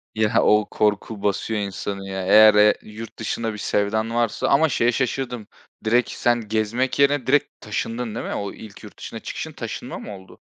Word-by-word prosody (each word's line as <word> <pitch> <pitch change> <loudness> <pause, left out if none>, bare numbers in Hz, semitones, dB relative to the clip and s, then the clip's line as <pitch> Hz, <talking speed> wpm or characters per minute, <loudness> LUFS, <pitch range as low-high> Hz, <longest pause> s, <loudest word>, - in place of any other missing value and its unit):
Ya, 110 -1 +2
o 105 0 +4
korku 105 0 -1
basıyor 105 +2 -1
insanı 100 0 -4
ya. 95 -1 -4
Eğer, 110 +2 +8
eee, 105 0 +6
yurt 110 +1 -10
dışına 115 0 -2
bir - - -7
sevdan 110 +3 -1
varsa 120 -2 0
ama 155 +3 +4
şeye 120 -2 +2
şaşırdım, 125 -2 -2 0.4
direkt 120 +3 +2
sen 120 -2 0
gezmek 110 +5 -1
yerine 140 -1 +3
direkt 145 +2 +1
taşındın 115 +2 -4
değil - - -4
mi? - - -4
O 100 -1 -4
ilk 105 -3 -12
yurt - - -13
dışına - - -7
çıkışın - - -6
taşınma - - -6
mı 105 - -8
oldu? 95 0 -15
110 Hz, 180 wpm, -22 LUFS, 105-120 Hz, 0.4 s, Eğer